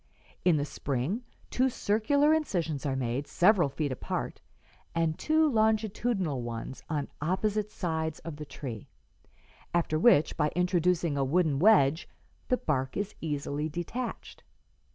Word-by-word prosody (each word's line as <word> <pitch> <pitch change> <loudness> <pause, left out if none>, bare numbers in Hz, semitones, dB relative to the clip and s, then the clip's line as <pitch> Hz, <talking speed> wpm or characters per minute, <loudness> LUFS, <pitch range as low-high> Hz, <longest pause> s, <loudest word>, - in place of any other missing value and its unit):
In 175 -4 +4
the 145 - 0
spring 145 - -2 0.3
two 260 +1 +2
circular 270 +8 +2
incisions 170 - -1
are 135 - 0
made, 130 +2 -2
several 180 -4 +4
feet 145 0 -2
apart, 130 - -4 0.5
and 165 -1 +1
two 315 - +2
longitudinal 215 - +1
ones 120 +2 -6
on 145 -3 -1
opposite 205 +6 0
sides 160 -5 -2
of 160 -2 -7
the 150 - -6
tree; 130 -6 -7 0.9
after 160 -2 +1
which, 160 -6 +5
by 150 -1 +2
introducing 180 -3 +1
a - - +2
wooden 150 0 +2
wedge, 165 -6 +4 0.4
the 250 - +2
bark 135 - -1
is 205 +1 -2
easily 150 0 -2
detached. 225 +10 -5
165 Hz, 130 wpm, -29 LUFS, 145-210 Hz, 0.9 s, which